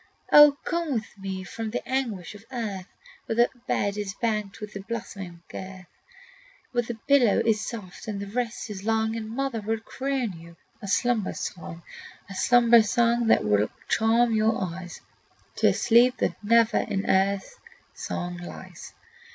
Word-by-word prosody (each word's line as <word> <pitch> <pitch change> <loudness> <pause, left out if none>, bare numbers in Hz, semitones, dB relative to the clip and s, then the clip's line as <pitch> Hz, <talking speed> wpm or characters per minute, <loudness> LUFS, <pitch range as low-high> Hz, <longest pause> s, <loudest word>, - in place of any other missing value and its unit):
"O 295 -1 +9
come 335 -4 -1
with 220 -3 -4
me 190 -1 -5
from 220 +4 -5
the 235 - -4
anguish 235 -10 -2
of 205 0 -13
earth, 205 -7 -4 0.4
Where 225 - -1
the 240 +1 +4 0.2
bed 200 0 0
is 200 -2 -4
banked 215 -3 -2
with 210 -1 -8
a - - -4
blossoming 195 -5 -7
girth, 185 -1 -8 0.9
"Where 245 -1 +1
the 240 0 -5
pillow 255 -7 +5
is 220 -2 +2
soft 205 -5 -7
and 205 -2 -3
the 200 - -4
rest 230 +1 -3
is 195 -2 -7
long, 220 0 +1
And 220 -1 -5
mother 255 -1 -2
will 220 +2 -2
croon 260 -1 -3
you 170 +1 -13 0.3
a 200 - -7
slumber 220 +1 +1
song, 170 -2 -6 0.4
"A 195 - -9
slumber 235 +3 +5
song 235 +2 +2
that - - +4
will 105 0 +2 0.2
charm 230 +1 +3
your 220 +1 +2
eyes 180 -1 -6 0.6
To - - +4
a - - +4
sleep 245 +2 +4
that - - -2
never 230 +1 +4
in 195 0 -2
earth 195 - +1 0.3
song 175 0 -4
lies! 175 0 -10
220 Hz, 165 wpm, -26 LUFS, 195-235 Hz, 0.9 s, O